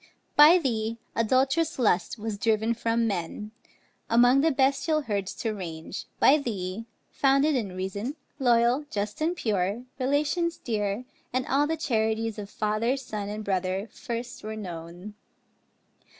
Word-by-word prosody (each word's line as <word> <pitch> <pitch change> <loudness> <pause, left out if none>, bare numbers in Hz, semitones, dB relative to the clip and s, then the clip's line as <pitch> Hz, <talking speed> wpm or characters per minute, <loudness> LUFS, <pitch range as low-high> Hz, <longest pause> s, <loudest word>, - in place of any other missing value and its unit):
By 305 +4 +9
thee 230 -7 -1 0.2
adult'rous 265 +7 +2
lust 205 -4 +1
was 215 -1 -4
driven 225 +1 +2
from 230 0 0
men, 205 +1 -3 0.6
Among 245 +3 +5
the 325 - +4
bestial 280 +3 +2
herds 200 -7 -3
to 225 -2 -2
range; 170 -3 -6
by 300 +3 +6
thee, 210 -4 -4 0.3
Founded 275 +2 +3
in 210 -9 -2
reason, 200 +8 -3 0.2
loyal, 245 +2 +3
just 210 +5 -3
and 335 +3 +1
pure, 205 - -1 0.2
Relations 300 +6 +1
dear, 210 0 -2 0.3
and 255 +1 0
all 285 +2 +2
the 320 +1 -1
charities 220 -5 0
Of 200 -1 -7
father, 215 +6 0
son, 210 -6 -5
and 210 +1 -5
brother, 190 +2 -1
first 235 +1 -6
were 215 +1 -5
known. 175 0 -7
225 Hz, 135 wpm, -27 LUFS, 205-265 Hz, 0.6 s, By